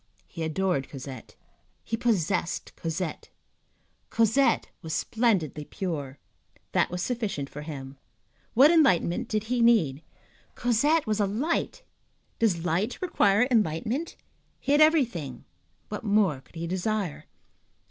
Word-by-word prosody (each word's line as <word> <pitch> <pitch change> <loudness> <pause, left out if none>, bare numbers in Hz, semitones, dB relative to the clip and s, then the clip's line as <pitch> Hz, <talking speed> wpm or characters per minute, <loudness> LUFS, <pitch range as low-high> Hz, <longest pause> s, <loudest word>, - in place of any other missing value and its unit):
He 165 - -9
adored 160 -3 0
Cosette, 130 -4 -9 0.5
he 225 - -2
possessed 190 -7 -1
Cosette, 165 0 -4 0.8
Cosette 230 +5 +2
was 160 -1 -4
splendidly 195 - 0
pure. 145 -6 -5 0.5
That - - +2
was 180 0 -3
sufficient 215 - -3
for 150 - -7
him. 140 -3 -8 0.6
What 275 +7 +7
enlightenment 250 - +3
did 215 -2 -1
he 240 +2 -1
need? 180 - +4 0.5
Cosette 285 +7 +2
was 215 -1 -1
a 205 - +2
light. 295 - -2 0.6
Does 180 -7 +1
light 180 +8 0
require 220 - +3
enlightenment? 220 - 0 0.4
He 280 - -2
had 290 +1 +5
everything; 235 - +2 0.4
what 210 - -5
more 200 -10 +2
could 135 - -25
he 165 +1 -4
desire? 185 -1 -2
200 Hz, 120 wpm, -27 LUFS, 160-235 Hz, 0.8 s, What